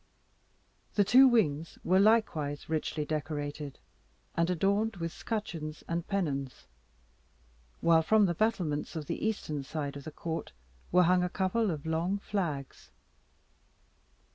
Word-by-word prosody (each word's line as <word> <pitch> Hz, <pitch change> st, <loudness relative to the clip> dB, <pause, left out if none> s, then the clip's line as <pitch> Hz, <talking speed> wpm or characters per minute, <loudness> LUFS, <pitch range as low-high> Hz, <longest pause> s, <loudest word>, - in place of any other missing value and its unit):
The 205 Hz, -, +5 dB
two 255 Hz, +7 st, +7 dB
wings 165 Hz, -, +1 dB
were 185 Hz, +2 st, +4 dB
likewise 195 Hz, -9 st, +2 dB
richly 155 Hz, -1 st, -2 dB
decorated, 145 Hz, -2 st, -4 dB, 0.6 s
and 170 Hz, +1 st, +2 dB
adorned 200 Hz, +5 st, +1 dB
with 165 Hz, -2 st, -4 dB
scutcheons 165 Hz, -9 st, -4 dB
and 170 Hz, 0 st, -2 dB
pennons, 140 Hz, -10 st, -2 dB, 1.2 s
while 165 Hz, -1 st, +5 dB
from 215 Hz, +5 st, +4 dB
the 175 Hz, -, +1 dB
battlements 170 Hz, -7 st, -1 dB
of 155 Hz, -2 st, -4 dB
the -, -, -4 dB
eastern 195 Hz, -9 st, -2 dB
side 145 Hz, 0 st, -4 dB
of 140 Hz, -, -8 dB
the -, -, -4 dB
court 160 Hz, -, -5 dB, 0.4 s
were 180 Hz, +1 st, +6 dB
hung 180 Hz, +1 st, +4 dB
a 180 Hz, -, 0 dB
couple 200 Hz, +4 st, 0 dB
of 155 Hz, -4 st, -4 dB
long 165 Hz, +5 st, 0 dB
flags. 170 Hz, -10 st, -4 dB
165 Hz, 130 wpm, -30 LUFS, 150-200 Hz, 1.2 s, two